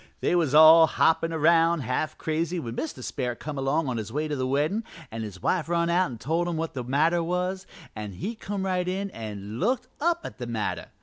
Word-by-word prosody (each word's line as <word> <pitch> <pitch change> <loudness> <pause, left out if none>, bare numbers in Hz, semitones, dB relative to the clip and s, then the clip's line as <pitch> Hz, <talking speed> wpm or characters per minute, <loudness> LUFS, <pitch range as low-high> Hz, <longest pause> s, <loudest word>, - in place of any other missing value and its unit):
"They - - +1
was 160 -5 +2
all 160 +1 +9
hoppin' 165 +1 +2
around 165 +1 +3
half 130 +5 -2
crazy 165 +2 -2
when 115 -6 -6
Mr. 155 -4 -5
Sperrit 125 -3 -3
come 150 -2 -5
along 140 +3 0
on 125 -2 -2
his 110 -1 -5
way 150 +4 -1
to 150 - -2
the 130 -1 -1
weddin' 150 - 0 0.3
an' 115 0 -5
his 100 -5 -8
wife 170 -3 0
run 170 0 +1
out 180 -2 +2
an' 120 - -7
told 165 +9 -1
him 170 -2 -2
what 165 0 -2
was - - -33
the 125 - -4
matter 170 +6 +1 0.4
an' 105 -2 -6
he 155 - -4
come 200 -3 -4
right 180 -1 0
in 195 +2 -2
an' 105 -1 -7
looked 250 +5 0
up 340 +2 +1
at - - -8
the 120 - -5
matter. 110 -3 -3
160 Hz, 225 wpm, -26 LUFS, 130-175 Hz, 0.4 s, all